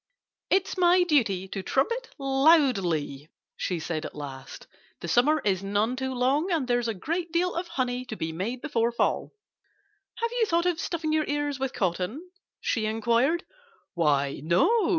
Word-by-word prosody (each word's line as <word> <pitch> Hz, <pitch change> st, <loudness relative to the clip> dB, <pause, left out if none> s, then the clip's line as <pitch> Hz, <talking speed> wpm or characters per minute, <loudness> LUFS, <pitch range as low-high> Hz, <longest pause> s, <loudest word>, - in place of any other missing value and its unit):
"It's 385 Hz, 0 st, +1 dB
my 355 Hz, 0 st, +5 dB
duty 220 Hz, -, +1 dB
to 195 Hz, -, -4 dB
trumpet 465 Hz, -, 0 dB
loudly," 255 Hz, -, +2 dB, 0.3 s
she 180 Hz, -3 st, -2 dB
said 160 Hz, -1 st, -3 dB
at -, -, -7 dB
last. 140 Hz, -3 st, -8 dB, 0.3 s
"The -, -, -6 dB
summer 260 Hz, -, +3 dB
is 190 Hz, -3 st, +1 dB
none 205 Hz, +5 st, 0 dB
too 260 Hz, 0 st, -3 dB
long. 275 Hz, +9 st, +1 dB
And 310 Hz, -7 st, 0 dB
there's 245 Hz, -1 st, +1 dB
a 225 Hz, -, -2 dB
great 335 Hz, -, -3 dB
deal 355 Hz, +2 st, +1 dB
of 345 Hz, +1 st, -3 dB
honey 250 Hz, -4 st, -2 dB
to 230 Hz, -, -6 dB
be 160 Hz, -5 st, -3 dB
made 215 Hz, +10 st, -4 dB
before 235 Hz, -6 st, +1 dB
fall.... 235 Hz, -, 0 dB, 0.8 s
Have 465 Hz, 0 st, -2 dB
you 480 Hz, -2 st, +1 dB
thought 340 Hz, -1 st, +1 dB
of 350 Hz, -2 st, +1 dB
stuffing 320 Hz, -2 st, -2 dB
your 310 Hz, -1 st, +2 dB
ears 290 Hz, -1 st, -1 dB
with 265 Hz, -1 st, -2 dB
cotton?" 195 Hz, -, -2 dB, 0.3 s
she 220 Hz, -2 st, 0 dB
inquired. 235 Hz, -, +1 dB, 0.5 s
"Why, 140 Hz, -4 st, +1 dB
no!" 170 Hz, -, +3 dB
255 Hz, 165 wpm, -27 LUFS, 190-320 Hz, 0.8 s, my